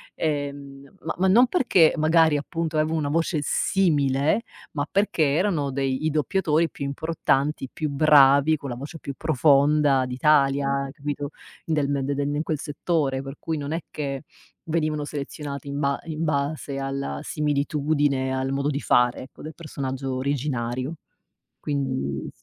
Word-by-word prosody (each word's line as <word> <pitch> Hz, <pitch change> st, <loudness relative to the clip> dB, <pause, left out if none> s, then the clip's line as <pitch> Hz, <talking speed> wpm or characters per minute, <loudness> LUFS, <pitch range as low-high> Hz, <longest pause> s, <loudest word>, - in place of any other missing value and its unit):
ehm, 140 Hz, -1 st, -4 dB
ma 165 Hz, -, -2 dB
ma 190 Hz, -, +3 dB
non 230 Hz, +7 st, +6 dB
perché 240 Hz, -, +4 dB
magari 160 Hz, 0 st, +4 dB
appunto 160 Hz, +2 st, -3 dB
avevo 155 Hz, +1 st, +1 dB
una 145 Hz, -2 st, -1 dB
voce 165 Hz, +1 st, 0 dB
simile 145 Hz, -1 st, +2 dB, 0.3 s
ma 145 Hz, 0 st, -3 dB
perché 200 Hz, -5 st, +2 dB
erano 160 Hz, -6 st, 0 dB
dei 135 Hz, +1 st, -1 dB
i -, -, +3 dB
doppiatori 155 Hz, +2 st, +1 dB
più -, -, -8 dB
importanti, 140 Hz, -1 st, -1 dB
più 155 Hz, -, -3 dB
bravi, 140 Hz, +1 st, +5 dB
con 140 Hz, -1 st, -7 dB
la 120 Hz, -, -4 dB
voce 140 Hz, +6 st, -8 dB
più 140 Hz, -, -6 dB
profonda 145 Hz, -2 st, +3 dB
d'Italia, 140 Hz, +1 st, +2 dB
capito, 145 Hz, 0 st, -4 dB, 0.3 s
del 150 Hz, -3 st, 0 dB
de 140 Hz, +1 st, -1 dB
den 145 Hz, +1 st, -1 dB
in -, -, 0 dB
quel 155 Hz, -3 st, -2 dB
settore, 145 Hz, -2 st, -1 dB
per 135 Hz, +1 st, -8 dB
cui 160 Hz, -, -3 dB
non 145 Hz, 0 st, -4 dB
è 165 Hz, +2 st, -2 dB
che 140 Hz, -2 st, -4 dB, 0.5 s
venivano 155 Hz, -2 st, 0 dB
selezionati 145 Hz, 0 st, -6 dB
in 140 Hz, 0 st, -4 dB
ba 140 Hz, -1 st, 0 dB
in 160 Hz, -1 st, -4 dB
base 145 Hz, -1 st, -2 dB
alla 135 Hz, 0 st, -3 dB
similitudine 145 Hz, -2 st, 0 dB
al 130 Hz, 0 st, -1 dB
modo 140 Hz, +1 st, 0 dB
di 140 Hz, -1 st, -1 dB
fare 125 Hz, -4 st, +2 dB
ecco 130 Hz, -, -14 dB
del 155 Hz, -, -7 dB
personaggio 135 Hz, -4 st, -4 dB
originario 130 Hz, -1 st, -2 dB, 0.6 s
quindi 130 Hz, -, -3 dB
145 Hz, 150 wpm, -24 LUFS, 140-155 Hz, 0.6 s, non